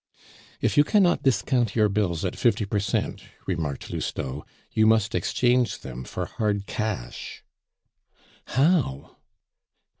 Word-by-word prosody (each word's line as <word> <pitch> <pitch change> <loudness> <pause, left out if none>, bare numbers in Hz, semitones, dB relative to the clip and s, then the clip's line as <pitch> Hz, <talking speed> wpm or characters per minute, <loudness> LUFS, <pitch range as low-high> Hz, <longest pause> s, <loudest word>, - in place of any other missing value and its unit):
"If - - +1
you 145 - +8
cannot 185 +1 +3
discount 120 -2 +1
your 110 -2 +4
bills 95 -4 0
at 90 - -2
fifty 110 -3 +2
per 100 +1 -1
cent," 100 - -1 0.2
remarked 80 -7 -3
Lousteau, 70 +3 -4 0.3
"you 110 0 +4
must 110 0 +3
exchange 125 +1 +2
them 65 -1 -7
for - - -4
hard 105 -2 -1
cash." 105 - -4 1.0
"How?" 135 - +1
105 Hz, 120 wpm, -25 LUFS, 90-120 Hz, 1.0 s, you